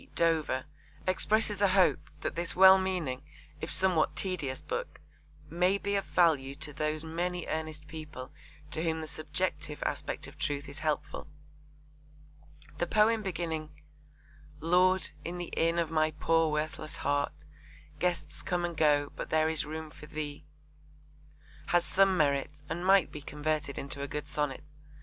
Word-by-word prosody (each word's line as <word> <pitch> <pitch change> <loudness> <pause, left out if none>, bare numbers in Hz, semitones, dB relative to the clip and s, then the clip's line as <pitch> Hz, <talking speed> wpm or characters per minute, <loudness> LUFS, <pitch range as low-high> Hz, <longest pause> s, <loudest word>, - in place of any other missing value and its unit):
Dover 160 -6 +2 0.4
expresses 210 +2 +2
a 200 - +6
hope 190 -1 +3
that - - -2
this 170 0 -1
well 190 +1 +9
meaning 175 -9 -2 0.4
if - - -4
somewhat 170 -5 +3
tedious 150 -5 -2
book 475 +1 -4 0.5
'may 180 +4 +2
be 200 0 -2
of 195 - 0
value 145 -6 +3
to 150 0 -4
those 155 +2 -1
many 175 +2 -2
earnest 155 -1 -4
people 150 -4 -8 0.4
to 155 - 0
whom 160 -1 0
the 155 - -5
subjective 155 0 -2
aspect - - -2
of - - -12
truth 145 0 -2
is 140 +3 -7
helpful.' 155 -2 -2 1.5
The 175 - +1
poem 215 +3 +4
beginning 165 -5 -3 0.9
Lord, 180 +4 +3
in 175 +1 -4
the 175 -1 -6
inn 165 +1 +2
of 165 -2 0
my 155 -1 +3
poor 160 +1 +2
worthless 155 0 -3
heart 145 0 0 0.7
Guests 170 -4 -1
come 175 -1 -1
and 170 -1 -4
go; 145 -2 +3
but - - -5
there 155 0 +3
is 160 -2 0
room 155 0 -6
for 150 - -12
Thee, 150 -2 -6 1.2
has 175 0 +3
some 195 -1 +4
merit 145 -1 +1
and 165 +3 -3
might 190 -2 +5
be 150 - -7
converted 150 -1 -2
into 140 0 -4
a 140 - -2
good 150 +1 -5
sonnet. 150 -2 -1
160 Hz, 150 wpm, -31 LUFS, 150-180 Hz, 1.5 s, well